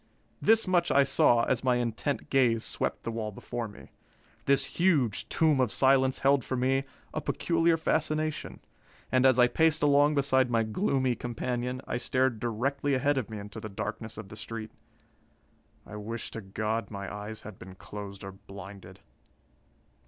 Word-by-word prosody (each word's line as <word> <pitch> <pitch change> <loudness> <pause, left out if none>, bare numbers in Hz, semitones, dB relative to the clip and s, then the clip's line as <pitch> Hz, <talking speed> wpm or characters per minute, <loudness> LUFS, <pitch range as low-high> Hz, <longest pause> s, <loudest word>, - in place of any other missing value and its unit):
This 225 +1 +4
much 175 -2 +2
I 140 - +5
saw 120 -3 +4
as 125 0 0
my 125 -1 +3
intent 120 +4 -2
gaze 120 -4 +3
swept - - -3
the 115 - -3
wall 110 -2 -3
before 120 +3 -5
me. 105 - -14 0.5
This 140 0 +3
huge 125 - +2
tomb 155 -4 +3
of 125 -4 +2
silence 130 +2 +4
held 140 -2 +4
for 130 - -3
me 135 +2 +1 0.3
a - - -2
peculiar 165 -1 +1
fascination, 155 -1 -1 0.5
and 130 +1 +5
as 130 -2 +4
I 125 - +7
paced 160 +3 +2
along 145 +1 +4
beside 130 -2 +3
my 115 -1 +2
gloomy 130 - 0
companion, 125 +1 -3
I - - -2
stared 130 -1 0
directly 135 +5 -1
ahead 140 +2 +2
of 120 - -5
me 110 - -6
into 105 +1 -8
the 110 0 -7
darkness 110 +2 -5
of 110 -3 -8
the 105 - -9
street. 110 0 -7 1.1
I 105 - -9
wish 110 +2 -5
to 115 - -6
God 110 +3 -3
my 100 -1 -6
eyes 105 +1 -7
had 110 -3 -10
been 95 +1 -11
closed 100 0 -9
or 95 - -6
blinded! 100 0 -12
120 Hz, 165 wpm, -29 LUFS, 110-140 Hz, 1.1 s, I